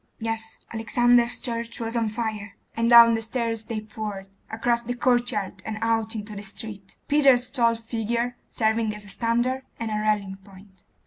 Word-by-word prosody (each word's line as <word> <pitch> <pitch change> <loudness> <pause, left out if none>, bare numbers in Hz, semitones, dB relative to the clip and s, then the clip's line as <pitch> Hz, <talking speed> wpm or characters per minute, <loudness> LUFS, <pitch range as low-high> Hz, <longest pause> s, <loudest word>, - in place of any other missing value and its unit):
'Yes, 225 -1 -4
Alexander's 240 +1 +3
church 235 -1 -3
was 230 0 -3
on 230 -2 +1
fire;' 215 -3 -4 0.2
and 230 +1 +1
down 235 -1 +9
the 225 - 0
stairs 225 -1 -2
they 220 -1 -4
poured, 215 -3 -6 0.2
across 235 +1 0
the 245 +1 -4
courtyard, 240 -6 0
and 220 -1 -4
out 225 0 0
into 210 0 -6
the 200 - -6
street, 200 -1 -8
Peter's 270 -4 +4
tall 235 -3 +3
figure 230 +1 -2
serving 220 -1 0
as 210 -1 -9
a - - -12
standard 240 +4 0 0.2
and 225 -1 -3
a 210 - 0
rallying 205 -2 0
point. 195 -1 -18
225 Hz, 170 wpm, -25 LUFS, 215-235 Hz, 0.2 s, down